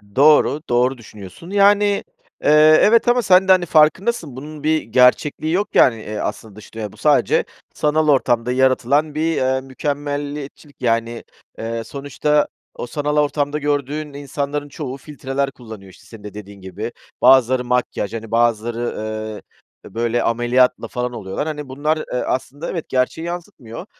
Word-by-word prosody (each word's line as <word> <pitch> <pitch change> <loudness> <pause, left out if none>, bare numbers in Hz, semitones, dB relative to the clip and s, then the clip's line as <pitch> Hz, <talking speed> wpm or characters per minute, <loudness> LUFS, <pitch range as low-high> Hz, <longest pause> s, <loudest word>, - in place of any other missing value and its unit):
Doğru, 150 +1 +4
doğru 125 +2 +2
düşünüyorsun, 105 - -12
yani, 205 0 +3 0.4
eee, - - +2 0.3
evet 230 +3 +4
ama 245 +1 +4
sen 190 -3 +4
de - - +6
hani 185 -2 +4
farkındasın, 160 - +2
bunun 150 +2 -9
bir 155 0 +2
gerçekliği 145 +5 +2
yok 205 +3 +1
yani, 125 - +5
eee, 105 0 -6
aslında 110 -1 -5
dış 105 - -14
dünyada. 110 -2 -5
Bu - - -18
sadece, - - +2 0.3
sanal 155 +1 +1
ortamda 125 -3 +2
yaratılan 130 +3 +2
bir, 160 +1 0
eee, 130 0 0
mükemmeliyetçilik 145 +1 -5
yani, 115 -1 -1 0.4
eee, 115 0 -4
sonuçta, 145 +3 -1 0.3
o 120 - -6
sanal 150 +2 -2
ortamda 145 0 0
gördüğün 145 +1 -2
insanların 145 +1 -4
çoğu 140 -2 -6
filtreler 140 -1 -4
kullanıyor, 110 -7 -12
işte - - -19
senin 110 -3 -13
de 105 - -9
dediğin 100 -1 -11
gibi. 105 +5 -6 0.3
Bazıları 130 0 +5
makyaj, 125 -4 -1
hani, 115 -1 -7
bazıları, 115 0 +1 0.6
eee, - - -10 0.5
bö - - -22
böyle 120 +1 0
ameliyatlı 120 +2 +2
falan 125 0 -4
oluyorlar. 100 +6 -4
Hani, 150 -3 -5
bunlar, 150 +4 -1
eee, 155 - -7
aslında 140 +4 -3
evet, 165 -4 -5
gerçeği 130 +6 -1
yansıtmıyor. 170 - -8
135 Hz, 155 wpm, -19 LUFS, 120-150 Hz, 0.6 s, de